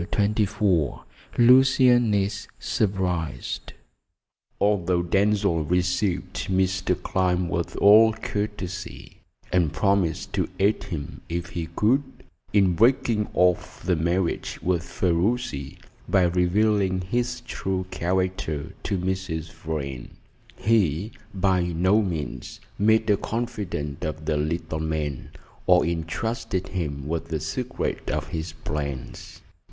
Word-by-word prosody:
CHAPTER 105 +1 +2
XXIV 95 - 0 0.3
LUCIAN 125 -1 +6
IS 100 +1 -1
SURPRISED 90 -6 -2 0.9
Although 90 -4 +2
Denzil 100 -1 +2
received 90 +1 0
Mr. 95 -1 +1
Clyne 90 -1 0
with 85 0 -2
all 110 +2 +7
courtesy, 105 -4 -5 0.3
and 85 -5 +3
promised 95 -1 0
to - - 0
aid 100 +1 +2
him, 80 -8 -6
if 85 +2 -3
he 85 -2 -4
could, 125 +7 +3 0.5
in 100 -3 +4
breaking 115 +1 +3
off 90 -1 +1
the 90 0 +2
marriage 85 +2 -1
with 90 -2 +1
Ferruci, 85 - -1 0.3
by 95 -2 +4
revealing 95 +2 +2
his 120 +6 -2
true 95 -5 -3
character 90 -4 -1
to 100 - -1
Mrs. 90 -3 -3
Vrain, 70 -6 -5 0.5
he 105 -3 +1 0.2
by 95 -2 +2
no 90 +5 +2
means 85 -8 -4 0.2
made 110 +2 +4
a 105 -2 +4
confidant 105 -12 -4
of 75 -1 -4
the 75 0 +1
little 80 +1 -2
man, 75 -4 -3 0.4
or 90 -1 +5
entrusted 85 +4 -2
him 75 -6 -3
with 85 +1 -2
the 80 -2 -2
secret 125 - -3
of - - -2
his 80 0 -4
plans. 70 -5 -5
90 Hz, 115 wpm, -25 LUFS, 85-105 Hz, 0.9 s, all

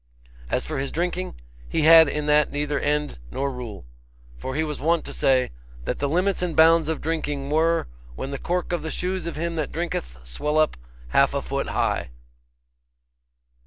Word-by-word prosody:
As 125 - 0
for 155 -3 -3
his 135 0 -2
drinking, 180 +2 -2 0.3
he 160 - 0
had 160 0 +9
in 150 +1 -2
that 150 -1 +4
neither 145 0 -1
end 150 - -1
nor 140 - -2
rule. 120 - -7 0.5
For 130 - -4
he 155 - +1
was 150 -2 -4
wont 165 +2 +1
to - - -7
say, 130 -1 +2 0.3
That - - -3
the 140 - 0
limits 180 +5 +1
and 175 -3 -2
bounds 160 0 +6
of 160 - -2
drinking 145 -3 -2
were, 165 - +2 0.3
when 135 - -5
the 140 - -4
cork 180 0 -2
of 175 - 0
the 160 - -4
shoes 180 0 -2
of 170 - -4
him 165 +1 -3
that 155 - -2
drinketh 110 - -3
swelleth 150 - +1
up - - -14 0.3
half - - +3
a - - 0
foot - - -2
high. - - 0
155 Hz, 185 wpm, -24 LUFS, 140-165 Hz, 0.5 s, had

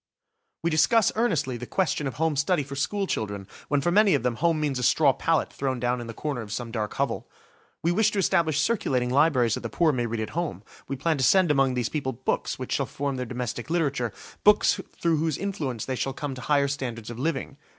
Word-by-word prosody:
We 170 - +1
discuss 170 +8 +4
earnestly 160 - 0
the 125 +1 -7
question 150 -6 0
of 135 - -5
home 160 -1 +1
study 155 +2 +1
for 140 +1 -8
school 200 +8 -1
children, 100 - -3 0.2
when 145 -1 +1
for 175 - +1
many 205 +1 +5
of - - -1
them 125 -2 0
home 165 -2 +2
means 145 -4 -1
a - - -2
straw 140 +2 +4
pallet 165 +3 0
thrown 130 -2 -2
down 125 0 0
in 120 - -7
the 115 - -6
corner 145 -5 -3
of 105 -2 -8
some 115 +1 -4
dark 110 -3 -3
hovel. - - -2 0.5
We 170 - +3
wish 215 +4 +3
to - - -2
establish 170 -5 +2
circulating 130 - +1
libraries 130 -5 +3
that - - -1
the 115 - -5
poor 165 +4 +2
may 120 -4 -1
read 115 0 -3
at 110 - -4
home. 160 - -3 0.2
We 135 - -3
plan 155 +2 0
to - - +1
send 185 +2 +5
among 135 -3 +2
these 120 -2 0
people 140 -4 -2
books 130 +3 -2
which - - -6
shall - - 0
form 140 -1 -3
their 125 -1 -3
domestic 120 0 -4
literature–books 165 - +1 0.2
through 165 -2 +2
whose 160 -2 0
influence 150 - -3
they 130 - -2
shall 135 +2 -2
come 145 0 -4
to 130 - -8
higher 140 +2 +2
standards 120 -5 -4
of 120 - -8
living. 140 -1 -2
140 Hz, 230 wpm, -26 LUFS, 125-165 Hz, 0.5 s, many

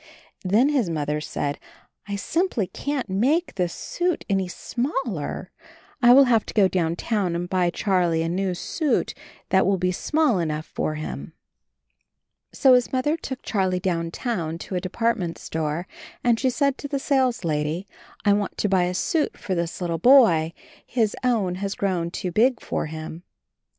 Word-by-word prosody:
Then 215 +9 +3
his 265 -11 +1
Mother 150 -2 -1
said, 145 -1 -3 0.5
'T 200 0 -3
simply 325 - 0
can't 285 +6 -3
make 265 - +1
this 180 -3 -1
suit 350 - -2
any 195 -3 +1
smaller; 235 - -3 0.5
I 240 -1 +7
will 270 +3 +9
have 235 -5 +3
to - - -6
82 - - -36
CHARLIE 195 -2 +5
go - - -24
downtown 180 +2 0
and 175 +1 -2
buy 180 -2 +1
Charlie 175 -4 +1
a - - -1
new 185 +1 -1
suit 300 - -1 0.4
that 190 - +4
will 195 -1 +3
be 180 0 +1
small 295 - +1
enough 155 -2 -2
for 155 - -3
him." 155 0 -6 1.2
So 265 -2 +5
his 250 -1 +3
Mother 265 +4 +1
took 265 -5 -7
Charlie 185 -4 0
downtown 170 0 -2
to 170 - -8
a 180 - 0
department 185 -3 -1
store, 160 +2 -3 0.4
and 235 -2 +3
she 260 - +2
said 280 +1 0
to 285 - -5
the 280 - -2
sales 265 -5 +1
lady, 155 +3 -1 0.4
"I 205 - +5
want 205 -1 -1
to 210 - 0
buy 185 -2 +3
a 180 +1 -2
suit 310 - 0
for 190 - -3
this 170 0 -3
little 170 -2 -1
boy. 175 - +6 0.3
His 225 -4 0
own 220 -8 +1
has 200 0 -2
grown 180 -4 -1
too 180 +1 -4
big 240 +6 +3
for - - -3
him." 160 +1 -7
190 Hz, 170 wpm, -24 LUFS, 170-245 Hz, 1.2 s, will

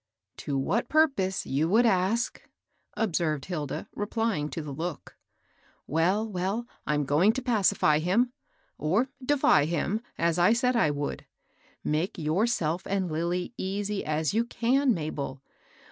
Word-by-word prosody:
" 95 - -53
To 140 -2 0
what 185 - 0
purpose? 270 -12 +2
you 150 +5 0
would 230 +5 +4
ask," 215 +3 +1 0.6
observed 165 -9 0
Hilda, 155 -6 -4
replying 205 -7 -1
to 165 - -5
the 150 - -6
look. 165 +2 -5 0.4
" - - -39 0.3
Well, 185 +8 +1
well, 200 +4 -2 0.2
Fm 150 -1 +1
going 165 +10 +4
to 260 - -3
pacify 200 - +3
him, 220 +10 +1 0.5
or 190 - +1
— - - -17
defy 255 - +4
him, 175 +7 -1 0.2
as 170 +1 +1
I 180 +6 +5
said 250 +1 +1
I 225 -10 +3
would. 145 0 -4 0.6
Make 160 +7 -1
yourself 170 +1 0
and 190 -3 -1
Lilly 170 +5 -2
easy 200 +1 -2
as 155 +1 -1
you 225 +2 +2
can, 245 +2 +2
Mabel. 140 -4 -4
185 Hz, 145 wpm, -28 LUFS, 155-225 Hz, 0.6 s, I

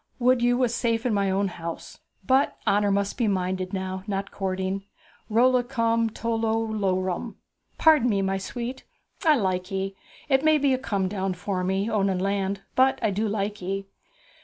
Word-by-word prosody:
would 250 0 +3
you 245 0 +3
was 250 -2 +1
safe 230 0 0
in 245 - +1
my 200 -1 +1
own 195 +1 +1
house! 170 -2 -7 0.3
But 265 +5 +2
honour 205 0 +3
must 200 +3 0
be 235 - +2
minded 185 -1 -1
now, 190 -1 -4
not 195 -1 -3
courting. 190 0 -2 0.4
Rollicum 230 -1 +2
rorum, 220 - -8
tol 230 -1 -1
lol 225 0 0
lorum. 190 0 -1 0.4
Pardon 305 -6 +5
me, 200 -3 +1
my 195 0 0
sweet, 240 +6 -5 0.4
I 315 -3 +5
like 185 -5 -1
ye! 195 0 -3 0.3
It 270 -1 +3
may 310 0 +5
be 280 -2 +2
a 255 - 0
come 200 -6 -1
down 190 -1 -2
for 185 0 -3
me, 190 +3 0
owning 195 -4 +1
land; 195 +1 -1
but 265 +1 +4
I 215 - +2
do 210 +3 0
like 205 0 -2
ye.' 195 +2 -3
200 Hz, 180 wpm, -25 LUFS, 190-235 Hz, 0.4 s, Pardon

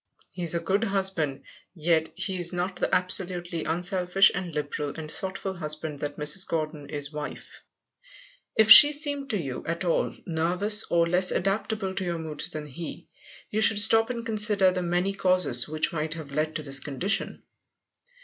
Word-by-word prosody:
He 180 - -8
is 170 -1 +1
a - - 0
good 195 +6 -1
husband, 190 -8 -1 0.3
yet 160 -1 0
he 190 -1 -4
is 175 -1 +2
not 180 +1 -3
the - - -1
absolutely 180 -2 -2
unselfish 180 +2 +2
and 180 -1 -5
liberal 145 -1 -4
and 155 -1 -7
thoughtful 190 +2 -5
husband 155 -3 -6
that 145 0 -5
Mrs. 150 +5 -1
Gordon 155 -3 -4
is 145 0 -3
wife. 150 0 -8 1.0
If 220 0 +4
she 295 0 +10
seemed 285 -2 -1
to 215 - 0
you 135 -8 -6
at 170 +3 -3
all 170 - 0
nervous, 180 +6 +2
or 170 -1 +1
less 180 +2 +2
adaptable 195 0 -2
to 190 - -3
your 175 -2 -3
moods 160 0 -3
than 155 -3 -6
he, 150 +4 -9 0.4
you 215 - -1
should 220 -1 +3
stop 225 +2 +7
and 235 -2 -5
consider 210 -4 +2
the 180 0 -3
many 180 +3 -1
causes 180 -10 +3
which 155 +2 -1
might 155 0 -3
have 155 -4 -9
led 155 +2 -2
to 155 - -3
this 135 -2 0
condition. 145 +9 -2
175 Hz, 175 wpm, -26 LUFS, 155-195 Hz, 1.0 s, she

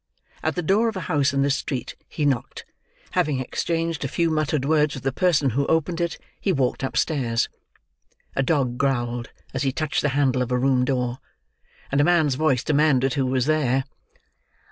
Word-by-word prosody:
At - - -1
the 180 - -2
door 205 +8 +3
of 225 - -2
a - - -3
house 145 -7 +1
in 140 0 +1
this 140 0 +2
street, 130 -4 -4
he 150 - -2
knocked; 135 -5 -1 0.5
having 145 -3 +1
exchanged 165 +4 -2
a - - 0
few 165 +4 0
muttered 155 -3 0
words 150 -1 +2
with 135 - -8
the 135 - 0
person 150 -3 +2
who 140 +5 0
opened 165 +2 0
it, 170 -1 -1 0.2
he 195 - 0
walked 135 -7 0
upstairs. 130 -4 0 0.9
A - - +2
dog 135 -4 0
growled 120 -3 -1 0.2
as 130 - -2
he 135 -2 +1
touched 155 +2 -1
the 145 - +1
handle 130 -3 +2
of 125 0 -2
a 125 - +2
room 125 0 +2
door; 125 -1 -1 0.7
and 140 +1 +3
a - - +4
man's 160 -4 +3
voice 135 -3 +1
demanded 140 -3 +2
who 135 -3 0
was 130 -1 +1
there. 140 -4 +2
140 Hz, 190 wpm, -24 LUFS, 130-155 Hz, 0.9 s, a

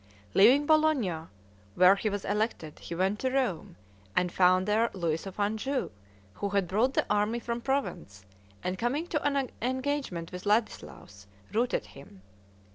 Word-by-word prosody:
Leaving 255 +9 +6
Bologna, 280 - +2 0.5
where 185 +2 +7
he 215 +2 -1
was 205 -1 -4
elected, 205 -7 -2
he 170 - -7
went 190 +4 0
to 260 - 0
Rome, 255 - -1 0.4
and 180 -1 +1
found 185 +1 +3
there 220 +3 +2
Louis 170 -2 -2
of 195 - -9
Anjou, 220 +7 -1 0.4
who 200 - -3
had 200 -2 0
brought 225 +8 +1
the - - +2
army 210 +3 +1
from 235 0 -4
Provence, 235 - -3 0.4
and 185 +1 -3
coming 265 +8 -1
to 305 -4 -2
an 280 -2 0
engagement 260 - -2
with 180 +2 -7
Ladislaus, 205 - -2 0.3
routed 240 +3 0
him. 100 -9 -15
210 Hz, 150 wpm, -29 LUFS, 180-260 Hz, 0.5 s, where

